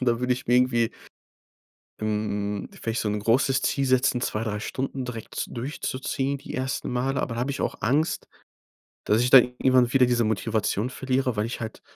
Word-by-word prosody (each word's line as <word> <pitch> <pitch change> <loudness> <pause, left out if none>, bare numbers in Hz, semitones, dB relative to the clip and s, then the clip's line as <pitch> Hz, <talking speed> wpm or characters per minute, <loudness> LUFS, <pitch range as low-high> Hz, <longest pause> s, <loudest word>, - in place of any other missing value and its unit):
und 130 - +1
da 120 +1 +1
würd 125 - -1
ich 125 +1 0
mir 120 - +3
irgendwie 120 -2 +3 1.1
ähm, 105 -1 -2
vielleicht 115 0 -3
so 105 - -1
’n 105 - -1
großes 130 +5 +2
Ziel 140 - +1
setzen, 130 -1 +2
2, 110 -3 -2
3 105 -2 -2
Stunden 130 +3 -3
direkt 115 -3 -5
durchzuziehen 135 +1 -2
die - - -9
ersten 130 +1 -2
Male. 130 +2 0
Aber 115 - -3
da 115 - -3
habe 130 +3 -1
ich 140 - -4
auch - - -1
Angst, 145 +8 0 0.8
dass 110 +3 +3
ich 125 - +2
da 135 - +10
irgendwann 125 0 +2
wieder 130 -2 +6
diese 120 -1 +2
Motivation 110 +1 0
verliere, 130 -2 -1
weil 105 +1 0
ich 115 - -5
halt 110 - -6
125 Hz, 190 wpm, -25 LUFS, 110-130 Hz, 1.1 s, da